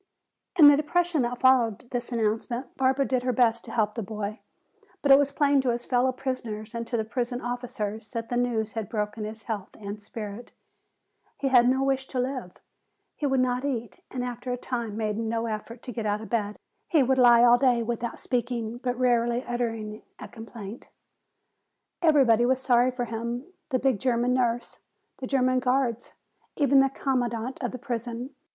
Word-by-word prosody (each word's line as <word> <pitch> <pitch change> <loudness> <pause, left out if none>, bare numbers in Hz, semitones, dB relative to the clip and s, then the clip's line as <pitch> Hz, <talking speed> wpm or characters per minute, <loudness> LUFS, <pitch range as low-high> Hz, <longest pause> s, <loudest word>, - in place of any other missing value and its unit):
In 305 -4 +10
the 290 - +9
depression 325 +1 +1
that 245 0 -1
followed 245 -4 +3
this 245 0 -3
announcement 235 +3 -2
Barbara 265 +1 +2
did 255 -2 0
her 250 0 0
best 235 -1 +2
to - - -9
help 210 -2 +1
the 230 - -4
boy. 210 +1 -5 0.6
But 280 - +4
it 270 - +9
was 285 -1 +1
plain 285 -1 +3
to 260 - 0
his 240 0 -2
fellow 255 +1 +2
prisoners 235 -5 -5
and 230 0 -4
to 235 - -1
the 220 - -1
prison 245 +1 -2
officers 225 -4 -4
that 230 0 -5
the 245 - -1
news 235 -3 0
had 225 -3 -4
broken 210 -1 -3
his 220 +1 -8
health 210 -4 -5
and 205 0 -6
spirit. 210 +2 -8 0.8
He 275 - -1
had 245 -2 +6
no 265 +1 +2
wish 270 -1 0
to 255 - -3
live. 250 -7 -3 0.6
He 290 - -1
would 265 -1 +2
not 250 0 0
eat 240 -7 -3
and 250 -1 -4
after 245 +1 -5
a 250 - -1
time 235 -4 -4
made 215 -1 -1
no 230 0 -1
effort 225 +2 -5
to 250 - -6
get 225 -2 -3
out 205 0 0
of 220 - -9
bed. 210 -3 -1 0.3
He 310 -5 +4
would 260 +1 +2
lie 240 -1 +7
all 245 0 +6
day 245 -3 +3
without 235 0 -3
speaking, 240 -2 -2
but 245 -1 -2
rarely 240 -1 +2
uttering 225 -4 -3 0.2
a - - -8
complaint. 225 -1 -9 1.1
Everybody 270 -9 +5
was 260 0 +2
sorry 250 -1 +3
for 250 -1 -3
him, 235 +8 -5 0.2
the 260 - +2
big 260 -4 +1
German 245 0 +1
nurse, 245 -1 -1 0.4
the 260 - -4
German 255 -1 +2
guards, 250 -2 0 0.4
even 280 -2 +4
the 270 0 +4
commandant 250 -2 -2
of 245 - -1
the 255 - -6
prison. 240 0 -4
245 Hz, 185 wpm, -27 LUFS, 225-260 Hz, 1.1 s, In